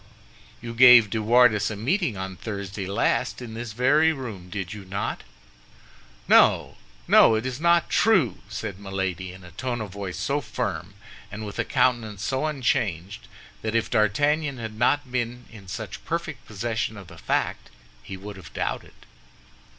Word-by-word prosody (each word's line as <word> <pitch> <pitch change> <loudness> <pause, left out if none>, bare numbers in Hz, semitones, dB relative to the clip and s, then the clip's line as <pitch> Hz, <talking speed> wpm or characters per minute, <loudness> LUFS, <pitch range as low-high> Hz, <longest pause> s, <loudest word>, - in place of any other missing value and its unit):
"You 115 0 -5
gave 120 -3 +8
De 110 - -1
Wardes 110 -2 +4
a 105 - -4
meeting 130 - 0
on 95 0 -5
Thursday 100 -1 -5
last 100 - 0
in 120 -3 -8
this 115 0 -6
very 150 +7 +4
room, 110 - -7
did 95 0 -5
you 105 -2 -8
not?" 100 +2 -4 1.1
"No, - - +4 0.3
no! 110 - +7
It 110 +3 -2
is 130 +2 -4
not 170 0 +4
true," 175 - +3
said 100 -2 -5
Milady, 95 -2 -3
in 95 0 -13
a 90 - -12
tone 120 +6 -3
of 105 -3 -5
voice 100 -2 -6
so - - -1
firm, 95 +3 -4 0.4
and 105 +1 -6
with 100 - -7
a - - +1
countenance 110 -6 0
so 135 +5 0
unchanged, 105 - -1 0.3
that 110 +1 -3
if 115 - 0
D'Artagnan 140 +7 +1
had 115 -2 -6
not 125 +4 +1
been 125 -1 -3
in 105 -4 -13
such - - -7
perfect - - -4
possession 110 +1 -3
of 100 - -10
the 85 -1 -14
fact, - - -2 0.3
he 95 +10 -8
would 100 +1 -9
have 95 - -12
doubted. - - -3
110 Hz, 165 wpm, -25 LUFS, 100-125 Hz, 1.1 s, gave